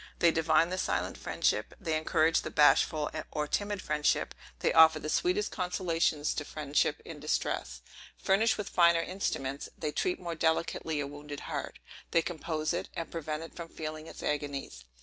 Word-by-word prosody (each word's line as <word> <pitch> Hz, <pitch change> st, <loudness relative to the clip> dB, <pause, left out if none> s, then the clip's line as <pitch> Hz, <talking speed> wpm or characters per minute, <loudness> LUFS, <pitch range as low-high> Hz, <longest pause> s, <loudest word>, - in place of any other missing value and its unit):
They 170 Hz, -, +5 dB
divine 160 Hz, +1 st, +3 dB
the 185 Hz, -, -2 dB
silent -, -, -1 dB
friendship; -, -, -1 dB
they 165 Hz, -6 st, -1 dB
encourage 155 Hz, +1 st, +2 dB
the -, -, -5 dB
bashful 150 Hz, 0 st, +4 dB, 0.2 s
or 150 Hz, -1 st, -2 dB
timid 205 Hz, +3 st, -2 dB
friendship; 150 Hz, 0 st, +1 dB, 0.2 s
they -, -, +1 dB
offer 160 Hz, -1 st, +8 dB
the 155 Hz, 0 st, -5 dB
sweetest 370 Hz, +4 st, +1 dB
consolations 170 Hz, -5 st, 0 dB
to 145 Hz, -, -3 dB
friendship 145 Hz, -1 st, 0 dB
in -, -, -8 dB
distress. 60 Hz, 0 st, -2 dB, 0.4 s
Furnished 220 Hz, +4 st, +2 dB
with 210 Hz, -, -4 dB
finer 170 Hz, -1 st, +4 dB
instruments, 140 Hz, -8 st, -3 dB
they 155 Hz, -2 st, -2 dB
treat 360 Hz, -, -1 dB
more 170 Hz, -1 st, -4 dB
delicately 160 Hz, -1 st, 0 dB
a -, -, -2 dB
wounded 145 Hz, 0 st, -8 dB
heart. -, -, -5 dB, 0.3 s
They 165 Hz, -, +3 dB
compose 160 Hz, -1 st, -2 dB
it, 175 Hz, -, -3 dB
and 165 Hz, -, -5 dB
prevent 155 Hz, -1 st, -4 dB
it 165 Hz, -, -11 dB
from 170 Hz, -1 st, -7 dB
feeling 155 Hz, 0 st, -6 dB
its -, -, -10 dB
agonies. 140 Hz, -, -3 dB
160 Hz, 170 wpm, -30 LUFS, 150-170 Hz, 0.4 s, offer